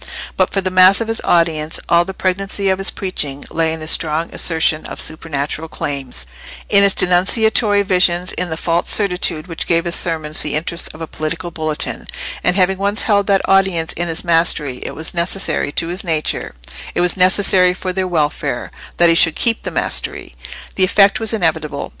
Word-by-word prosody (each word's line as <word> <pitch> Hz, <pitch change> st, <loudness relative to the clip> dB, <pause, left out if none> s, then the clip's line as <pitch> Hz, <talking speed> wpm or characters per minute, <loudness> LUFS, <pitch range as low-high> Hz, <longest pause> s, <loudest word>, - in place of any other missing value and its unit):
But -, -, +1 dB
for 195 Hz, -, 0 dB
the 185 Hz, 0 st, -3 dB
mass 185 Hz, +1 st, +6 dB
of 230 Hz, -, -3 dB
his 225 Hz, -, -3 dB
audience 165 Hz, -2 st, +1 dB
all 170 Hz, 0 st, +3 dB
the 190 Hz, -, -6 dB
pregnancy 195 Hz, +1 st, -1 dB
of 190 Hz, 0 st, 0 dB
his 195 Hz, -, -1 dB
preaching 145 Hz, -7 st, -3 dB
lay 165 Hz, -1 st, 0 dB
in 160 Hz, 0 st, -5 dB
his 155 Hz, -, 0 dB
strong 160 Hz, +1 st, +1 dB
assertion 160 Hz, -2 st, +1 dB
of -, -, -8 dB
supernatural 155 Hz, 0 st, -3 dB
claims, 140 Hz, -, -4 dB, 0.4 s
in 200 Hz, -, +5 dB
his 200 Hz, -1 st, +5 dB
denunciatory 205 Hz, +3 st, +3 dB
visions, 180 Hz, -2 st, +2 dB
in 180 Hz, -1 st, -3 dB
the 160 Hz, -, -4 dB
false 170 Hz, +1 st, -1 dB
certitude 180 Hz, -5 st, 0 dB
which 165 Hz, -3 st, -5 dB
gave 170 Hz, 0 st, +1 dB
his 170 Hz, -, -2 dB
sermons 160 Hz, -4 st, -2 dB
the 150 Hz, -, -2 dB
interest 170 Hz, +2 st, -3 dB
of 160 Hz, -, -12 dB
a -, -, -3 dB
political 165 Hz, +2 st, -5 dB
bulletin; 155 Hz, -2 st, -4 dB, 0.4 s
and 180 Hz, -, +2 dB
having 190 Hz, 0 st, +2 dB
once 200 Hz, +2 st, 0 dB
held 200 Hz, -2 st, +1 dB
that 195 Hz, -2 st, +1 dB
audience 190 Hz, -4 st, +2 dB
in 175 Hz, -, -3 dB
his 165 Hz, 0 st, -3 dB
mastery, 165 Hz, -6 st, +1 dB
it -, -, -7 dB
was 160 Hz, +1 st, -1 dB
necessary 175 Hz, -3 st, -1 dB
to 165 Hz, -, 0 dB
his 180 Hz, +2 st, -3 dB
nature—it 65 Hz, -, -4 dB
was 175 Hz, 0 st, +3 dB
necessary 185 Hz, -1 st, +4 dB
for 185 Hz, 0 st, -4 dB
their 190 Hz, 0 st, -1 dB
welfare—that 170 Hz, +1 st, -1 dB
he 165 Hz, -, +5 dB
should 165 Hz, -1 st, +4 dB
keep 230 Hz, -1 st, +1 dB
the -, -, -4 dB
mastery. -, -, -2 dB, 0.4 s
The 190 Hz, -, +2 dB
effect 195 Hz, +1 st, +4 dB
was 220 Hz, -1 st, -1 dB
inevitable. 160 Hz, -8 st, -1 dB
175 Hz, 185 wpm, -17 LUFS, 160-190 Hz, 0.4 s, mass